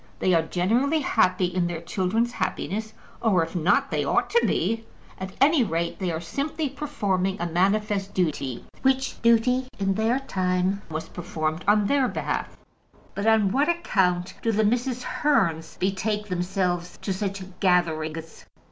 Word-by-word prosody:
They 185 - +2
are 165 - +5
generally 235 - +1
happy 185 -8 +2
in 180 0 0
their 170 -2 -3
children's 190 +7 0
happiness, 220 0 -3 0.3
or 190 -7 +3
if 165 +3 -7
not, 175 0 +2
they - - 0
ought - - +1
to 475 - +4
be. 225 0 0 0.3
At 190 0 -6
any 285 0 +5
rate, 170 -4 -2
they 185 -3 -1
are 160 - -2
simply 285 - -3
performing 205 -10 -1
a 175 - -1
manifest 195 +3 +1
duty, 145 -8 -1 0.2
which 265 0 +1
duty, 240 +3 +3
in 195 -1 +1
their 225 +5 +1
time, 185 -5 0
was 160 0 -4
performed 160 -1 -3
on 210 0 +4
their 275 +3 +2
behalf. - - -3 0.6
But 200 +2 -2
on 220 -3 +4
what 280 - +2
account 190 - +1
do 230 - +1
the 215 0 +2
Mrs. 245 +3 0
Hearns 170 - 0
betake 205 +3 -1
themselves 180 -1 -1
to 195 - -1
such 195 0 -3 0.2
gatherings? 165 -3 0
195 Hz, 155 wpm, -25 LUFS, 175-230 Hz, 0.6 s, are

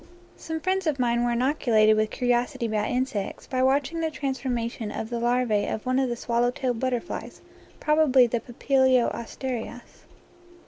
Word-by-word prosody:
Some 320 0 -5
friends 375 0 0
of 300 -3 +1
mine 240 -1 +1
were 240 - +1
inoculated 235 -4 +3
with 215 0 +1
curi 245 +3 -3
osity 245 +1 +1
about 215 -1 -1
insects 245 -6 -2
by 255 -1 -2
watching 275 +5 +1
the 325 -1 0
transformation 245 -6 -3
of 220 +2 -5
the 235 - -2
larvae 240 -3 +1
of 215 - -4
one 255 +1 +1
of 265 -2 +1
the 240 - -2
swallow 235 +1 0
tailed 250 -2 -2
butterflies, 255 +4 -3 0.4
probably 300 -4 +4
the 235 0 -1
Papilio 260 +1 +2
asterias. 240 0 -6
245 Hz, 165 wpm, -25 LUFS, 235-265 Hz, 0.4 s, probably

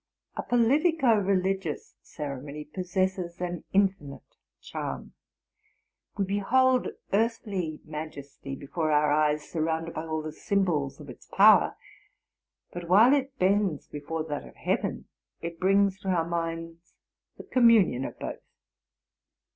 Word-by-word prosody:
A - - -2
politico 270 +3 +3
religious 190 -4 -1
ceremony 145 +1 -7
possesses 185 +1 -2
an 175 -2 -4
infinite 190 -8 -1 0.2
charm. - - -6 1.0
We 200 - +1
behold 250 +6 +2 0.3
earthly 200 -7 -1
majesty 145 -3 -7
before 155 +3 -2
our 150 0 +3
eyes, 150 0 +1
surrounded 165 0 -2
by 160 +1 -5
all 155 -1 -2
the 155 - -5
symbols 170 -9 -1
of - - -11
its - - -12
power; - - +6 1.0
but, 175 -1 -7
while 220 +8 +7
it 275 -1 -1
bends 190 - +1
before 155 +2 -4
that 150 -2 -4
of - - -16
heaven, - - -2 0.3
it 170 0 -6
brings 195 0 +3
to 195 - -9
our 170 -3 +1
minds 165 0 -5 0.4
the - - -9
communion 230 - +4
of - - -6
both. - - -6
175 Hz, 125 wpm, -27 LUFS, 155-200 Hz, 1.0 s, while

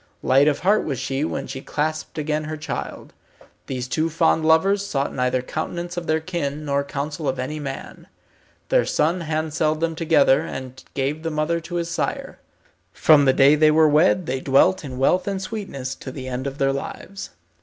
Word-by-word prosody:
Light 135 +3 +4
of 150 - +1
heart 205 +4 +3
was 140 -4 -3
she 135 +2 -2
when 135 -3 -3
she 135 0 -6
clasped 155 +3 -3
again 155 0 -1
her 155 0 -5
child. 155 - -6 0.5
These 125 -1 -4
two 160 +5 0
fond 160 0 +2
lovers 190 +6 +3
sought 140 -8 -2
neither 125 0 0
countenance 170 +5 -4
of 175 -1 -5
their 155 0 +2
kin, 155 -3 -4
nor 140 -1 0
counsel 145 +2 -4
of 130 - -2
any 130 +4 -4
man. 135 -2 -7 0.6
Their - - +4
son 170 +4 0
handselled 155 -1 -1
them 165 0 0
together, 160 -4 +3
and 130 0 -7
gave 140 +3 -1
the 165 - -2
mother 155 +2 0
to 170 +2 -8
his 170 -1 -2
sire. - - -3 0.5
From 150 -2 +5
the 135 - +6
day 135 +2 +6
they 155 0 +5
were 155 +1 +5
wed 165 +4 +3
they 130 -1 -2
dwelt 140 +8 +3
in 130 -3 -7
wealth 180 +9 +2
and 200 - -1
in - - -3
sweetness 190 - -5
to 130 - -8
the 130 -1 -7
end 130 +1 -3
of 140 0 -5
their 135 -1 +1
lives. 195 +7 -6
155 Hz, 195 wpm, -22 LUFS, 135-165 Hz, 0.6 s, the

